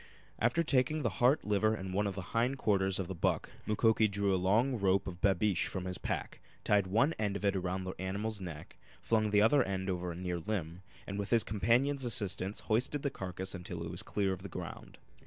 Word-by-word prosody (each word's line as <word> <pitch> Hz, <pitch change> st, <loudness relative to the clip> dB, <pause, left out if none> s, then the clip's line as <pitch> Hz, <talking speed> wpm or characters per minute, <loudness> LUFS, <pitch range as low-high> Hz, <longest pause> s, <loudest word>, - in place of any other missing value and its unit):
After 120 Hz, +9 st, +2 dB
taking 150 Hz, +1 st, +1 dB
the 120 Hz, -, +1 dB
heart, 130 Hz, +5 st, +4 dB
liver 105 Hz, +1 st, +2 dB
and 95 Hz, -2 st, -6 dB
one 105 Hz, +2 st, +1 dB
of 100 Hz, -, -3 dB
the 95 Hz, -, -4 dB
hind 120 Hz, +4 st, +1 dB
quarters 95 Hz, -5 st, +2 dB
of 95 Hz, -, -2 dB
the 95 Hz, -, -4 dB
buck 85 Hz, -, -1 dB, 0.2 s
Mukoki 110 Hz, 0 st, +3 dB
drew 100 Hz, -1 st, 0 dB
a -, -, +3 dB
long 110 Hz, +8 st, +2 dB
rope 95 Hz, 0 st, +2 dB
of 90 Hz, -2 st, -7 dB
babeesh 100 Hz, 0 st, +2 dB
from 95 Hz, -2 st, -4 dB
his 90 Hz, -1 st, -4 dB
pack, -, -, -4 dB, 0.2 s
tied 100 Hz, -2 st, +3 dB
one 115 Hz, -, +3 dB
end 105 Hz, -2 st, 0 dB
of 100 Hz, -, -3 dB
it 100 Hz, 0 st, +2 dB
around 95 Hz, 0 st, -2 dB
the 95 Hz, 0 st, -4 dB
animal's 100 Hz, +3 st, -3 dB
neck, 80 Hz, -5 st, -8 dB, 0.3 s
flung 110 Hz, -2 st, +2 dB
the 105 Hz, 0 st, +4 dB
other 140 Hz, +5 st, +5 dB
end 95 Hz, -3 st, -1 dB
over 90 Hz, -1 st, -3 dB
a -, -, -7 dB
near 90 Hz, 0 st, -3 dB
limb, 85 Hz, -2 st, -4 dB, 0.2 s
and 100 Hz, 0 st, -4 dB
with 100 Hz, -, -3 dB
his 115 Hz, -2 st, +5 dB
companion's 120 Hz, +8 st, +1 dB
assistance 105 Hz, -4 st, -1 dB
hoisted 125 Hz, +6 st, 0 dB
the 140 Hz, -, 0 dB
carcass 95 Hz, -2 st, -4 dB
until 90 Hz, -2 st, -6 dB
it 85 Hz, -, -5 dB
was 90 Hz, -, -3 dB
clear 100 Hz, -2 st, -1 dB
of 95 Hz, -, -7 dB
the 100 Hz, -, -7 dB
ground. -, -, -8 dB
100 Hz, 220 wpm, -33 LUFS, 95-110 Hz, 0.3 s, other